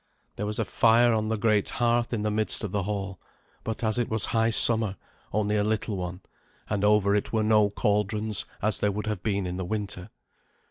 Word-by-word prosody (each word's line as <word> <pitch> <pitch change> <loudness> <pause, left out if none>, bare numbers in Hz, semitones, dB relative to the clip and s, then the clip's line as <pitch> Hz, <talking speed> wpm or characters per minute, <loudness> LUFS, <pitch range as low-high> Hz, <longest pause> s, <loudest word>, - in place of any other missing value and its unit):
There 105 - -4
was 105 - -2
a - - -1
fire 120 +1 +3
on 110 -1 -1
the 110 0 -1
great 105 -2 +1
hearth 120 0 0
in 110 -3 -2
the 105 - -1
midst 110 +1 0
of 105 - -4
the 100 - -1
hall; 100 -1 -5 0.4
but 110 +1 -5
as 110 +2 +1
it 120 - -1
was 110 -2 +1
high 115 0 +1
summer, 110 -3 +6 0.4
only 105 0 0
a 105 - +1
little 110 0 -2
one, 90 0 -6 0.5
and 100 -1 -2
over 105 -1 +3
it 105 - -1
were 110 -1 0
no 105 -1 +3
cauldrons, 105 +1 -1 0.2
as 110 +1 +1
there 105 - +1
would 105 +2 -4
have 105 -4 -3
been 100 -2 -1
in 90 0 -4
the 95 - -3
winter. 100 -1 -5
105 Hz, 215 wpm, -26 LUFS, 100-110 Hz, 0.5 s, summer